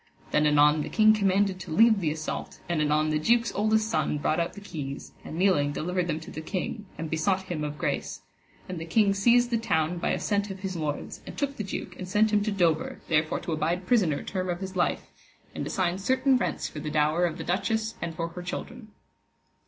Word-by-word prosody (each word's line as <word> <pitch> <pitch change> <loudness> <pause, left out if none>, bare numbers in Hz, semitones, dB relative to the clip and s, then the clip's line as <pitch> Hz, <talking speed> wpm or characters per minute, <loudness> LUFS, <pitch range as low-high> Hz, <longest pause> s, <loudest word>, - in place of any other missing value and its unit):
Then 150 0 +3
anon 150 +1 +5
the - - -4
king 215 -1 +5
commanded 195 -2 +2
to 175 -2 -8
leave 220 +5 +5
the 160 - +1
assault, 155 0 -5
and 170 -2 0
anon 150 +1 +2
the 155 - +1
duke's 230 +7 +2
oldest 220 +1 +2
son 225 -8 0
brought 155 +2 0
out 170 - -1
the - - -9
keys, 145 -8 -6
and 160 - -7
kneeling 175 -6 +3
delivered 180 +3 -1
them 155 -1 -1
to - - -10
the 155 - -6
king, 200 +5 -4
and 165 - -4
besought 185 +5 0
him 175 -5 -4
of 150 0 -4
grace; - - -2 0.5
and 180 -2 -5
the 165 - -5
king 200 +4 +3
seized 240 +4 +4
the 230 - +2
town 165 -5 0
by - - -1
assent 205 0 0
of 195 -1 -7
his 190 -2 -4
lords, 150 -3 -4
and - - -8
took 280 -1 -1
the 210 - -4
duke 185 -2 -5
and 185 -1 -6
sent 215 +2 +3
him 210 - +4
to 210 +1 -1
Dover, 170 -5 +1
there 155 -2 +5
for 155 - -3
to - - -4
abide 165 +4 -1
prisoner 180 -11 +2
term 185 -2 -3
of 175 0 -2
his 190 -1 -6
life, 175 - 0 0.5
and - - -4
assigned 185 0 -1
certain 260 +5 +3
rents 250 - -1
for 150 - -8
the 150 - -4
dower 155 +3 +2
of 165 - -5
the - - -5
duchess 220 +5 0
and 165 -1 -4
for 165 0 -3
her 180 +2 -8
children. 220 +6 -6
180 Hz, 225 wpm, -27 LUFS, 155-205 Hz, 0.5 s, anon